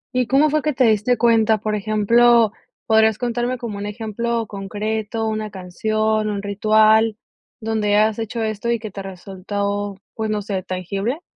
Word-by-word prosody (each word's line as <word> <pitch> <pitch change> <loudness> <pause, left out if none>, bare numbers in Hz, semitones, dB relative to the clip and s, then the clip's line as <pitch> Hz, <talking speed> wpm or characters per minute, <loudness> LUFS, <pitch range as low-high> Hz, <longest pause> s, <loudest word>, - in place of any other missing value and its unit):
¿Y 250 -2 +1
cómo 285 +3 +3
fue 305 -1 +1
que 300 0 -1
te 255 - +2
diste 220 +2 +3
cuenta?, 225 -2 +3
por 215 +1 -3
ejemplo, 220 +2 +3 0.3
¿podrías 220 -1 +4
contarme 245 +1 -2
como 220 -5 -6
un 205 - -4
ejemplo 225 +2 -3
concreto, 215 +2 -3
una 215 -1 -3
canción, 215 +3 -1
un 205 -1 -3
ritual 215 +2 +3 0.4
donde 215 -2 0
has 215 +1 +2
hecho 225 +1 -3
esto 215 +2 -3
y 235 - +2
que 215 -2 -8
te 195 - -7
resultó, 200 +2 -4 0.2
pues, 220 -1 -3
no 210 -1 -1
sé, 195 -2 -3
tangible? 195 - -3
215 Hz, 165 wpm, -20 LUFS, 205-230 Hz, 0.4 s, podrías